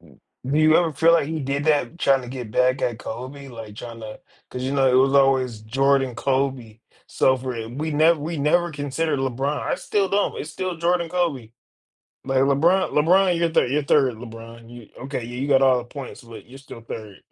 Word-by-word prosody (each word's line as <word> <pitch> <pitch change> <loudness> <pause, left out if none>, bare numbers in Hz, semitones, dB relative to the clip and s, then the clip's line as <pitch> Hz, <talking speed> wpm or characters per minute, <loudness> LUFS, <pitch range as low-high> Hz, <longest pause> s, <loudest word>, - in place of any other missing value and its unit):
Do 85 - -6
you 155 0 +5
ever 165 -3 +1
feel 160 +4 +4
like 165 -4 +3
he 160 +1 -3
did 140 +1 -2
that, 150 0 +1
tryna 135 -6 +1
get 125 -4 -7
back 125 +3 +1
at 120 -2 -1
Kobe, 130 +4 -8
like 115 -4 -10
tryna 115 -2 -9 0.3
'cause 125 0 -6
you 130 - -2
know, 135 -2 +3
it - - +1
was 135 +2 +4
always 130 -5 +2
Jordan, 135 +2 +1
Kobe, 130 -4 -2 0.3
so 130 - +2
for 130 0 -5
i 115 -1 -5
we 150 +7 -4
never 160 +2 +4
we 165 +3 -4
never 170 +4 +1
considered 145 +1 -2
LeBron, 135 +3 -2
I - - -1
still 200 -2 -1
don't, 200 +1 0
it's 150 - -6
still 185 -2 -4
Jordan, 170 +1 0
Kobe. 160 -10 -2 0.7
Like 135 0 0
LeBron 160 +8 +3
LeBron, 180 +4 +3
your 170 -1 +1
3rd, 130 -5 +2
your 145 0 0
3rd, 135 -4 +3
LeBron, 115 0 -11
you 120 -3 -12 0.2
okay, 135 -2 -4
yeah, 120 +1 -8
you 135 - -2
got 135 -1 +4
all 130 -1 +4
the 120 - -6
points, 130 0 -9
but 115 -1 -12
you're 135 - -12
still 135 -4 -12
3rd. 110 -3 -9
135 Hz, 205 wpm, -22 LUFS, 120-155 Hz, 0.7 s, you